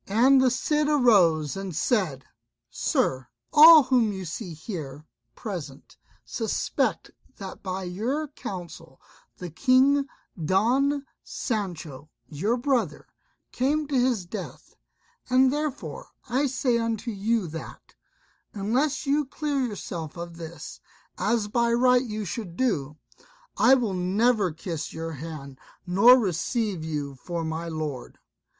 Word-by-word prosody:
And 255 Hz, +6 st, +5 dB
the 260 Hz, -, +4 dB
Cid 300 Hz, +4 st, 0 dB
arose 190 Hz, -, +4 dB
and 195 Hz, -3 st, -5 dB
said, 155 Hz, -, 0 dB, 0.5 s
"Sir, 130 Hz, -1 st, 0 dB, 0.3 s
all 315 Hz, 0 st, +10 dB
whom 250 Hz, -4 st, +2 dB
you 190 Hz, -2 st, -6 dB
see 170 Hz, +1 st, -6 dB
here 155 Hz, -4 st, -7 dB, 0.3 s
present, 170 Hz, -, -7 dB, 0.3 s
suspect -, -, -2 dB, 0.2 s
that 190 Hz, -1 st, -9 dB
by 190 Hz, 0 st, -4 dB
your 230 Hz, +12 st, -2 dB
counsel 175 Hz, -, -9 dB, 0.4 s
the 180 Hz, -2 st, -7 dB
King 275 Hz, -, +3 dB, 0.4 s
Don 260 Hz, -, +2 dB, 0.2 s
Sancho 165 Hz, -, -4 dB, 0.2 s
your 200 Hz, +11 st, -1 dB
brother 240 Hz, -, -1 dB, 0.5 s
came 295 Hz, +4 st, 0 dB
to 280 Hz, -, -1 dB
his 245 Hz, -7 st, +1 dB
death; 175 Hz, -, -8 dB, 0.6 s
and 260 Hz, +1 st, +4 dB
therefore 295 Hz, -2 st, -4 dB, 0.2 s
I 275 Hz, +4 st, +1 dB
say 255 Hz, -2 st, 0 dB
unto 230 Hz, 0 st, -2 dB
you 215 Hz, +1 st, 0 dB
that, 160 Hz, +1 st, -9 dB, 0.6 s
unless 250 Hz, +10 st, 0 dB
you 290 Hz, +1 st, +1 dB
clear 290 Hz, 0 st, -2 dB
yourself 175 Hz, -8 st, -5 dB
of 170 Hz, -1 st, -7 dB
this, 165 Hz, -2 st, -9 dB, 0.4 s
as 215 Hz, +1 st, +1 dB
by 235 Hz, +2 st, +1 dB
right 250 Hz, +1 st, +4 dB
you 215 Hz, -3 st, -4 dB
should 180 Hz, -2 st, -6 dB
do, 150 Hz, -, -1 dB, 0.6 s
I 265 Hz, -, +6 dB
will 235 Hz, -7 st, -1 dB
never 195 Hz, +2 st, +1 dB
kiss 165 Hz, -1 st, -5 dB
your 165 Hz, 0 st, -5 dB
hand, 140 Hz, -3 st, -8 dB, 0.3 s
nor 200 Hz, +8 st, +7 dB
receive 200 Hz, -1 st, -1 dB
you 150 Hz, -3 st, -4 dB
for 170 Hz, +5 st, -5 dB
my 160 Hz, +1 st, -4 dB
lord." 155 Hz, -6 st, -5 dB
205 Hz, 125 wpm, -26 LUFS, 165-255 Hz, 0.6 s, all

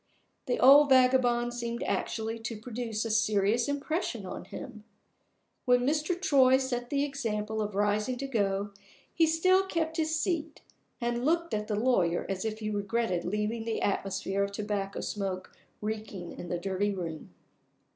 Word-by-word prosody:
The 245 Hz, -, 0 dB
old 280 Hz, +3 st, +8 dB
vagabond 250 Hz, -2 st, +4 dB
seemed 235 Hz, -1 st, -3 dB
actually 225 Hz, 0 st, -2 dB
to 225 Hz, -1 st, -5 dB
produce 225 Hz, -1 st, -4 dB
a 225 Hz, -, -2 dB
serious 215 Hz, +1 st, +2 dB
impression 285 Hz, -, -2 dB
on -, -, -7 dB
him! 245 Hz, -7 st, -9 dB, 0.8 s
When 245 Hz, 0 st, +4 dB
Mr. 310 Hz, +5 st, 0 dB
Troy 265 Hz, -7 st, +5 dB
set 245 Hz, -2 st, -3 dB
the 285 Hz, -1 st, +1 dB
example 220 Hz, -6 st, -2 dB
of 210 Hz, -2 st, -3 dB
rising 210 Hz, +4 st, +1 dB
to 275 Hz, +2 st, -4 dB
go, 205 Hz, -4 st, 0 dB, 0.4 s
he 325 Hz, -1 st, +4 dB
still 370 Hz, +4 st, +4 dB
kept 325 Hz, -2 st, -1 dB
his 315 Hz, 0 st, 0 dB
seat, 320 Hz, -2 st, -2 dB, 0.4 s
and 240 Hz, 0 st, -1 dB
looked 335 Hz, +3 st, +1 dB
at 210 Hz, 0 st, -1 dB
the 215 Hz, -, -1 dB
lawyer 185 Hz, -9 st, +2 dB
as 195 Hz, +1 st, -2 dB
if 220 Hz, 0 st, -3 dB
he 215 Hz, 0 st, -2 dB
regretted 205 Hz, -3 st, -1 dB
leaving 210 Hz, +4 st, -1 dB
the 225 Hz, -1 st, -2 dB
atmosphere 195 Hz, 0 st, -1 dB
of 200 Hz, -, -2 dB
tobacco 200 Hz, -1 st, -3 dB
smoke 190 Hz, -2 st, -4 dB, 0.3 s
reeking 210 Hz, -4 st, -5 dB
in 175 Hz, -, -8 dB
the 175 Hz, -, -1 dB
dirty 195 Hz, +3 st, -1 dB
room. 165 Hz, -4 st, -6 dB
230 Hz, 155 wpm, -29 LUFS, 205-265 Hz, 0.8 s, old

